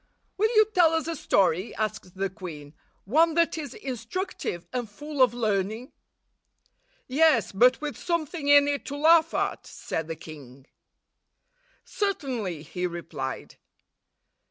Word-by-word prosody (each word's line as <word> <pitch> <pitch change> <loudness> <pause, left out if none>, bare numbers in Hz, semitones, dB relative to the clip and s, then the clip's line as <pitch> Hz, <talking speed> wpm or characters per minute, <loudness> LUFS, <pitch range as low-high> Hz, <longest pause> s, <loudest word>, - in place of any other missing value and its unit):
"Will 435 +3 +2
you 430 0 +7
tell 335 -3 +5
us 325 -1 0
a 330 0 -3
story," 185 - +1
asked 215 -4 -4
the 195 0 -1
queen 155 -7 -9 0.2
— - - -41
"one 315 - +3
that 335 0 +2
is 295 -5 -6
instructive 250 - -5
and 245 -3 -3
full 295 +6 -5
of 255 - +6
learning?" 220 +1 -1 1.2
"Yes, 280 -3 +3
but 250 +6 +4
with 300 -2 -4
something 335 -3 -3
in 285 0 +7
it 285 -1 -1
to 285 - -5
laugh 320 +2 +5
at," - - -2
said 160 -1 -5
the 165 - -4
king. 140 -5 -12 1.2
"Certainly," 260 - -3
he 180 +2 -3
replied. 165 -6 -6
245 Hz, 135 wpm, -26 LUFS, -, 1.2 s, you